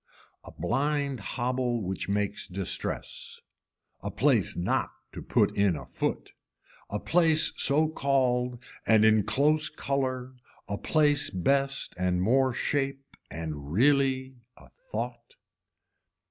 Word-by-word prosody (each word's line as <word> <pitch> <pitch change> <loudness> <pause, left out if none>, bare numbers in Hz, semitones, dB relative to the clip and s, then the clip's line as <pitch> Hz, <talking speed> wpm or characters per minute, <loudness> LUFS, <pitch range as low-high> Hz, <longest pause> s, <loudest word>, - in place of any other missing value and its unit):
A - - -11
blind 140 0 -1
hobble 120 +1 -2
which 95 +1 -3
makes 100 0 -1
distress. 95 0 -4 0.6
A - - -4
place - - +2
not 85 - 0 0.2
to - - -8
put - - +1
in 100 -4 +3
a - - -7
foot, - - -3 0.6
a 105 - -2
place 160 +5 +4
so 155 +3 +2
called 125 -4 +1 0.3
and 110 -1 +5
in 110 0 +5
close 150 +8 +2
color, 130 -2 -2 0.3
a 100 - -4
place 150 -2 +2
best 135 +8 0
and 90 -1 +1
more 130 +7 +3
shape 135 +2 -2
and 75 -2 -6
really 130 - +2 0.2
a - - -17 0.2
thought. 480 - -5
130 Hz, 120 wpm, -28 LUFS, 100-140 Hz, 0.6 s, and